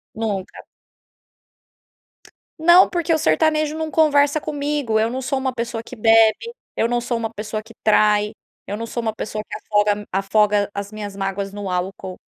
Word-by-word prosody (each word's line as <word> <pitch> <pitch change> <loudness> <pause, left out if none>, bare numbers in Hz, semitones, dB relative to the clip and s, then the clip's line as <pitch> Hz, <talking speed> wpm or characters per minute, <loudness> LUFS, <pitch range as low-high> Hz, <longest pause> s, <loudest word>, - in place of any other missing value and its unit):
nunca! 205 -4 -4 2.0
Não, 345 +3 +7
porque 340 -1 0
o - - +1
sertanejo 305 - +1
não 315 - -2
conversa 290 -1 +3
comigo. 290 -6 -1
Eu 220 +1 +2
não 260 +2 -4
sou 265 +1 -1
uma 265 0 -1
pessoa 235 -1 -3
que 255 - -10
bebe, 225 - +3 0.2
eu 230 - +1
não 240 0 0
sou 240 0 -2
uma 225 -1 -3
pessoa 215 +1 -5
que 225 - -15
trai, 210 -1 +3 0.3
eu 205 - -4
não 230 - -5
sou 235 +1 -4
uma 220 -2 -2
pessoa 215 0 -5
que - - -6
afoga 210 0 +1
m 205 0 -5
afoga 205 +1 +2
as 200 0 -5
minhas 210 -2 -7
mágoas 195 0 -3
no 200 -2 -5
álcool. 185 +1 -4
220 Hz, 175 wpm, -21 LUFS, 205-270 Hz, 2.0 s, Não